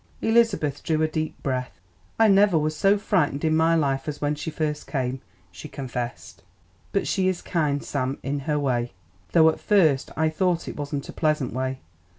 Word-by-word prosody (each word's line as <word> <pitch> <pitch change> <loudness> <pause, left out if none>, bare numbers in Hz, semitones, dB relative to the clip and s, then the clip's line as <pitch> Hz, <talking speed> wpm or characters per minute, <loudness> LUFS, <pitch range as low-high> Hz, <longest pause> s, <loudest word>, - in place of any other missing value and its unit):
Elizabeth 225 - +2
drew 155 -1 0
a - - +3
deep 155 0 -3
breath. 125 - -3 0.4
"I 225 - +5
never 200 -3 +5
was 155 0 0
so 195 +6 +3
frightened 170 -8 0
in 155 0 +2
my 165 +1 +3
life 135 -3 0
as 150 -1 -4
when 145 0 0
she 150 +2 -5
first 150 -1 -3
came," 130 -2 -2 0.3
she 155 - -10
confessed. 120 -6 -6 0.5
"But 195 - 0
she 190 -1 +1
is 185 -2 -1
kind, 150 -4 0
Sam, 135 -1 -2
in 140 +1 -2
her 150 - +2
way, 125 -4 -1 0.4
though 160 -2 +6
at 160 - -3
first 160 -10 +3
I 160 +1 +2
thought 170 +1 0
it - - -5
wasn't 145 -1 -4
a - - -8
pleasant 155 -6 0
way. 130 +1 -3
150 Hz, 185 wpm, -24 LUFS, 135-165 Hz, 0.5 s, though